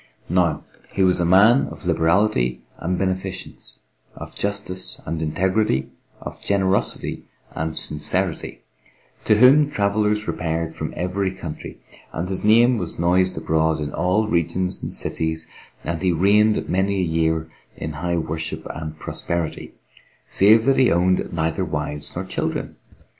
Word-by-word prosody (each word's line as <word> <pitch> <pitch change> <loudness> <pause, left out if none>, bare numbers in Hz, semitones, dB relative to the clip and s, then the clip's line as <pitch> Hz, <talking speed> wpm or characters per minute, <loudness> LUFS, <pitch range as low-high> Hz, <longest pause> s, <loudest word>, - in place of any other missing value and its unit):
Now 85 -3 +1 0.3
he 95 - +1
was 90 -1 +3
a 85 - +1
man 105 +10 +5
of - - -10
liberality 80 - +1 0.2
and 90 +2 -2
beneficence, 95 0 -4 0.4
of - - -9
justice 100 -2 -2
and 80 +1 -3
integrity, 95 +1 0 0.3
of - - -8
generosity 95 -1 0 0.3
and 80 0 -4
sincerity, 85 +3 -1 0.6
to 110 - +4
whom 140 +5 +6
travellers 105 -2 0
repaired 80 0 -2
from 80 - -4
every 95 +2 -1
country, 90 -5 -8 0.3
and 85 +3 -3
his 95 0 +1
name 115 +3 +5
was 90 -4 -3
noised 90 +2 +2
abroad 80 0 +1
in 75 -1 -4
all 90 +6 +1
regions 90 +1 -1
and - - -5
cities 80 0 -2 0.4
and 85 -1 -3
he 95 -1 +2
reigned 105 +5 +3
many 95 +1 0
a - - +1
year 80 -1 0 0.3
in 80 - -4
high 85 +3 -2
worship 80 0 -4
and 80 -1 -7
prosperity, 85 +1 -4 0.5
save 110 +3 +5
that 135 - +3
he 130 - +4
owned 90 +2 +1
neither 85 +3 -1
wives 75 -3 -3
nor 90 +2 -3
children. 95 - -3
90 Hz, 140 wpm, -22 LUFS, 80-100 Hz, 0.6 s, whom